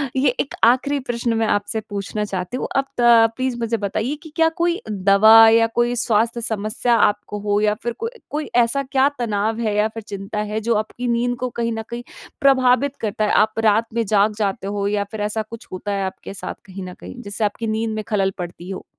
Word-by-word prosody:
ये 265 +1 +3
एक 275 - -2
आखिरी 260 +5 +3
प्रश्न 235 0 -1
मैं 225 0 +1
आपसे 205 +2 0
पूछना 205 +1 -3
चाहती 185 +3 -4
हूँ। - - -3
अब 275 - +2 0.2
त 230 -1 +6
प्लीज़ 255 -1 -1
मुझे 230 0 -1
बताइए 215 +6 -2
कि 315 - -11
क्या 325 0 +4
कोई 345 +1 +1
दवा 210 +3 +7
या 230 0 +4
कोई 240 0 +2
स्वास्थ्य 235 0 +1
समस्या 220 +2 0
आपको 205 -1 +1
हो? 205 0 0
या 210 0 +3
फिर 240 - -2
को 460 - -2 0.2
कोई 300 +1 -4
ऐसा 240 +3 +3
क्या 270 0 +4
तनाव 220 -1 -1
है 215 -3 0
या 210 +1 +3
फिर 220 0 -8
चिंता 200 +1 -5
है, 210 +1 -2
जो 230 +2 0
आपकी 215 +3 -3
नींद 240 +1 +1
को 255 0 -2
कहीं 235 -1 -2
न 225 - -3
कहीं 235 0 -5 0.4
प्रभावित 270 0 +3
करता 215 0 -1
है? - - 0
आप 215 +1 +3
रात 220 +1 +3
में 230 0 0
जाग 210 +1 +3
जाते 200 -2 -2
हो 200 0 -2
या 205 0 0
फिर 220 -2 -5
ऐसा 210 +1 -1
कुछ 230 +1 -10
होता 185 +2 -4
है 195 -1 -1
आपके 190 +1 -7
साथ? 195 - -6
कहीं 195 0 -8
न - - -9
कहीं, 90 +1 -9
जिससे 205 +2 -4
आपकी 215 +2 -3
नींद 220 +1 -1
में 215 - -3
खलल 195 -3 +1
पड़ती 175 0 -7
हो? 190 - -6
220 Hz, 220 wpm, -21 LUFS, 205-240 Hz, 0.4 s, दवा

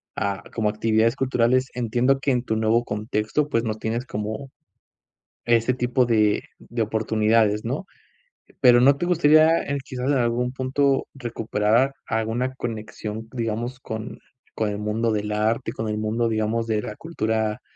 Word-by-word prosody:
a, 100 0 -2
como 110 -2 +1
actividades 110 +2 +2
culturales. 130 -1 +2
Entiendo 125 +3 +1
que 140 0 0
en 125 -1 +1
tu 110 - -1
nuevo 110 +2 +2
contexto, 110 +7 -1
pues, 115 -3 +1
no 110 - 0
tienes 115 +3 -3
como 110 +5 -5 1.0
ese 120 +1 +3
tipo 125 0 +1
de 105 -3 +2 0.2
de 120 0 -3
oportunidades, 110 0 +1
¿no?, 135 +11 -3 0.7
pero, 125 -2 +6
¿no 140 +2 +5
te 175 - -2
gustaría, 160 -1 +5
eh, 140 - -2
quizás 130 +2 -2
en 140 - +3
algún 120 0 0
punto, 135 +1 0
recuperar 115 0 0
alguna 115 +3 -1
conexión, 110 -1 -6
digamos 120 +1 -3
con 110 -2 -6 0.4
con 110 - 0
el 105 - -3
mundo 110 +2 -1
del 105 0 -2
arte, 110 +4 0
con 110 - -4
el 105 - -2
mundo, 110 +2 0
digamos, 110 +1 -1
de 110 -2 0
la 105 - -6
cultura 110 -7 -2
115 Hz, 155 wpm, -24 LUFS, 110-130 Hz, 1.0 s, pero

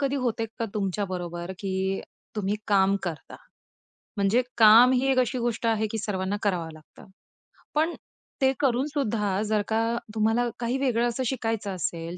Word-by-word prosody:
कधी 280 0 0
होतंय 240 -3 -1
का 230 - 0
तुमच्याबरोबर? 185 -3 -3
की 190 -1 -1 0.4
तुम्ही 205 -1 0
काम 195 -1 +4
करता, 170 -4 -6 0.8
म्हणजे 200 +5 +3 0.2
काम 230 +3 +8
ही 260 +1 +2
एक 265 - +2
अशी 250 0 +1
गोष्ट 235 -1 -1
आहे, 220 -1 +2
की 225 - -3
सर्वांना 200 -1 -2
करावं 180 -6 -1
लागतं. 155 -1 -16 0.7
पण 320 +3 +2 0.5
ते 265 0 +5
करूनसुद्धा 240 -7 0
जर 215 -1 +2
का 220 0 +1 0.3
तुम्हाला 225 +3 +2
काही 240 +2 -1
वेगळं 240 -3 +1
असं 240 +2 -2
शिकायचं 225 -6 -2
असेल, 170 0 -4
220 Hz, 150 wpm, -26 LUFS, 195-245 Hz, 0.8 s, काम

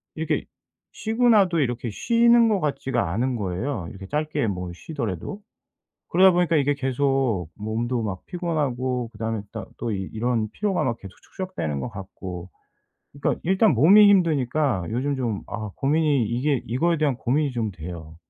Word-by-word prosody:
이렇게 - - -1 0.5
쉬고 225 +3 0
나도 190 -7 +4
이렇게 120 -3 -1
쉬는 235 - +4
것 205 -3 +2
같지가 135 - -1
않은 125 +5 0
거예요 95 +1 -3
이렇게 95 0 -10
짧게 150 -3 -1
뭐 90 -3 -3
쉬더라도. 115 - -5 0.7
그러다 185 +1 +6
보니까 175 -2 +2
이게 145 0 +2
계속 135 - 0
몸도 115 +3 -2
막 100 -4 -4
피곤하고 130 -8 -2
그다음에 110 -1 -3
따 110 -3 -5
또 115 - -2
이 95 - -2
이런 115 -1 0
피로가 200 - 0
막 115 -2 0
계속 95 -1 -11
축적되는 185 - -4
것 120 - -4
같고 95 -2 -8 0.6
그러니까 140 - -1
일단 190 +3 +4
몸이 195 - +7
힘드니까 150 - +2
요즘 135 +5 -1
좀 115 -6 -2
아 110 -3 -5
고민이 145 -3 +2
이게 125 +4 0
이거에 165 +8 +1
대한 150 -4 +2
고민이 140 +4 0
좀 115 -4 -1
돼요. 80 -1 -9
130 Hz, 335 characters per minute, -24 LUFS, 110-155 Hz, 0.7 s, 몸이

